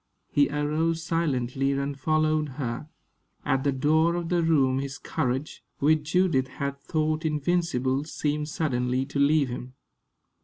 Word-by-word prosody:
He 145 -1 +3
arose 155 +3 0
silently 135 -5 0
and 140 +1 -2
followed 155 +1 +1
her. 130 +2 -4 0.6
At 135 0 +1
the 140 - +2
door 155 +5 +2
of 170 -1 -3
the 175 -1 +2
room 135 -5 +3
his 135 0 -4
courage, 130 +4 -3
which 150 +2 +1
Judith 170 -8 +3
had 140 +1 -4
thought 155 +1 -1
invincible, 150 -4 0
seemed 150 -1 -2
suddenly 130 -4 0
to 140 0 -4
leave 140 -1 +3
him. 125 +1 -7
145 Hz, 140 wpm, -26 LUFS, 135-155 Hz, 0.6 s, He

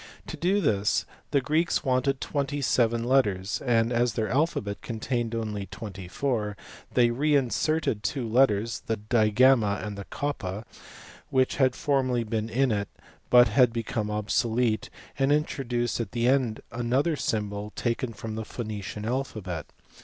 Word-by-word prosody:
To - - -6
do 185 +6 +1
this 105 - +1 0.2
the 140 - +2
Greeks 155 +7 +1
wanted 130 0 +1
27 130 -5 0
letters, 105 -7 +1
and 115 -2 +2
as 120 -2 +1
hoir 110 -2 -1
alphabet 125 -7 0
contained 115 0 -2
only 105 -3 -3
24, 105 +3 -3 0.4
they 120 -1 +5
re 145 +5 +2
inserted 140 -2 +1
two 115 +4 -2
letters 115 -2 +2
(the 115 - 0
digamma 110 0 +3
and 105 -1 -5
koppa) 105 -8 -3 0.7
which 130 -1 +2
had 130 -2 +3
formerly 130 -4 +1
been 110 0 -2
in 130 +2 +2
it 100 -2 -1 0.4
but 120 -2 +7
had 120 +2 +4
become 115 -2 -2
obsolete, 110 +2 0 0.3
and 135 +1 +3
introduced 125 -6 0
at 115 -4 -4
the 120 0 +1
end 130 -4 +2
another 125 +7 +1
symbol 105 -5 -2
taken 120 0 -1
from 110 0 -7
the 110 0 -4
Phoenician 105 -2 -6
alphabet. 110 - -3
120 Hz, 140 wpm, -27 LUFS, 105-130 Hz, 0.7 s, but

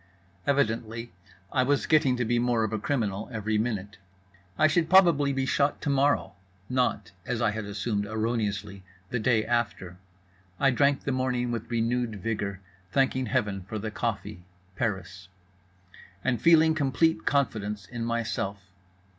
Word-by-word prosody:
Evidently 115 -4 0 0.4
I 130 - +2
was 140 +2 +1
getting 150 -5 +3
to 125 - 0
be 120 +1 +1
more 120 -2 +2
of 110 0 -2
a 110 - -1
criminal 105 -5 -2
every 110 -1 -1
minute; 105 -3 -3 0.6
I 155 - +4
should 160 +1 +2
probably 170 -7 +5
be 135 -1 -1
shot 140 +2 +1
to 145 - +1
morrow, 140 -3 +2 0.3
not 125 -5 0 0.2
(as 125 -2 -1
I 115 -2 +2
had 110 0 -4
assumed 100 0 -2
erroneously) 105 -3 -2 0.3
the 125 - 0
day 110 -1 +2
after. 110 -6 -2 0.6
I 135 - +4
drank 140 +2 +2
the 135 - -1
morning 125 -2 0
with 115 -1 -4
renewed 120 0 0
vigor, 100 -1 -3 0.3
thanking 130 -1 +1
heaven 105 -5 0
for 100 +4 -6
the 110 +1 -4
coffee, 105 -4 -3 0.3
Paris; 95 -4 -3 1.0
and 120 -4 0
feeling 160 -1 +6
complete 155 +2 +1
confidence 105 -8 0
in 120 +2 -5
myself. 115 -3 -2
115 Hz, 145 wpm, -27 LUFS, 105-130 Hz, 1.0 s, feeling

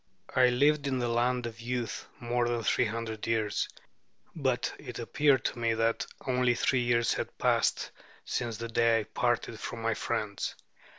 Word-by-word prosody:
] - - -43
I 130 -1 +6
lived 140 +3 +3
in 130 -1 0
the 120 -1 0
Land 120 +1 +1
of 115 0 -7
Youth 120 -2 -3
more 120 0 0
than 120 -1 -1
three 125 - +3
hundred 110 -1 -4
years; 110 -2 0 0.7
but 130 -6 0
it 125 -4 -7
appeared 135 +2 +2
to - - -1
me 115 -1 +1
that 115 0 +1 0.2
only 125 -1 +2
three 130 +1 +2
years 120 -1 +2
had - - -4
passed - - +2 0.3
since 115 -2 -2
the 115 - -4
day 115 0 +3
I - - -5
parted 120 0 -1
from 115 -1 -5
my 115 0 +2
friends. 105 -3 -2
120 Hz, 175 wpm, -30 LUFS, 115-125 Hz, 0.7 s, I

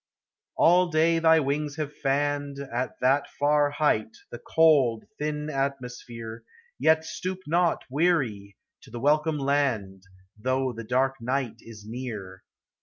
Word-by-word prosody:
All 180 +2 +5
day 165 0 +2
thy 160 0 +5
wings 145 +1 -2
have 150 -1 -4
fanned, 145 0 -1
At 130 -2 -4
that 135 +3 +3
far 145 0 +3
height, 145 -7 0
the 120 - -7
cold, 140 -8 +3 0.2
thin 150 0 -2
atmosphere, 125 -5 -5 0.4
Yet 160 0 +3
stoop 185 +3 -5
not, 170 +2 +1
weary, 130 - 0 0.2
to - - -16
the 120 - -7
welcome 150 +3 +2
land, 135 -9 0 0.3
Though 130 +3 -1
the 115 0 -7
dark 130 +3 0
night 125 -2 -2
is 110 -2 -13
near. 110 -6 -7
140 Hz, 130 wpm, -26 LUFS, 120-150 Hz, 0.4 s, All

